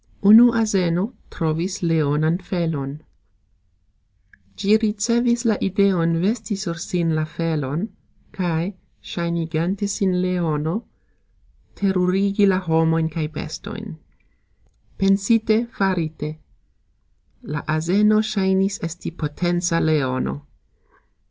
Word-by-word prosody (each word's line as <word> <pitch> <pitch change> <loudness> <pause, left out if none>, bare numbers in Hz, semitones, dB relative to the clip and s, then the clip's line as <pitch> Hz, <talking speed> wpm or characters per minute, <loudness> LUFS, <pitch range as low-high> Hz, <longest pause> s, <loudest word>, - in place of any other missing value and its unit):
Unu 225 +4 +9
azeno 200 -3 +1 0.2
trovis 165 +4 -2
leonan 160 0 +1
felon. 155 -6 -3 1.5
Gxi 210 +1 +4
ricevis 235 +3 +1
la 220 -3 +3
ideon 185 -4 +2
vesti 215 +3 -1
sur 195 -4 -4
sin 170 -2 -1
la 155 0 0
felon, 155 +1 -2 0.4
kaj 175 +1 -2 0.3
sxajnigante 170 +3 -2
sin 190 -2 0
leono, 170 +1 -1 0.9
terurigi 195 +1 +2
la 190 -1 +3
homojn 160 -2 +1
kaj 155 -1 -3
bestojn. 195 +5 -7 1.0
Pensite, 215 +3 +3
farite. 170 -8 -2 1.1
La 150 -1 -5
azeno 195 +8 +3
sxajnis 195 -2 0
esti 165 +1 -5
potenca 175 +2 -1
leono. 130 - 0
180 Hz, 85 wpm, -22 LUFS, 160-200 Hz, 1.5 s, Unu